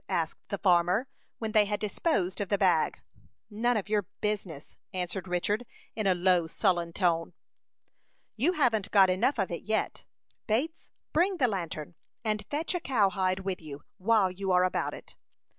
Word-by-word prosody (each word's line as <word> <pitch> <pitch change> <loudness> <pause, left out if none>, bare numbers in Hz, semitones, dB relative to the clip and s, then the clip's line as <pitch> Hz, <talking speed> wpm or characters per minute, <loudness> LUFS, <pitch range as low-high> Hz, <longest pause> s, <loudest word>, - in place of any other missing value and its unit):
asked 160 -1 -1
the 200 - -2
farmer, 180 +5 +3 0.3
when 220 -1 -3
they 215 -1 +5
had 205 0 -2
disposed 205 - 0
of 200 - -3
the 200 - +2
bag. 180 -5 +2 0.5
"None 235 +3 +1
of 205 - -3
your 205 -3 0
business," 190 -8 -3 0.2
answered 185 0 -3
Richard, 195 +6 0 0.3
in 215 -3 -1
a 185 - +4
low, 175 -2 +3
sullen 175 -1 +1
tone. 170 -2 0 1.0
"You 290 +11 +2
haven't 235 - +1
got 190 -3 +6
enough 230 +10 +1
of 195 -4 -1
it 170 - -4
yet. 220 +1 -1 0.4
Bates, 285 +10 -1 0.2
bring 360 +4 +2
the 255 - +3
lantern, 170 -6 -4 0.3
and 215 -1 -1
fetch 305 +5 -2
a 355 - 0
cowhide 195 - +1
with 190 -2 -3
you, 145 -2 -9 0.2
while 200 -1 +3
you 190 +1 -3
are 180 0 +5
about 185 - 0
it." - - -13
195 Hz, 165 wpm, -29 LUFS, 180-220 Hz, 1.0 s, got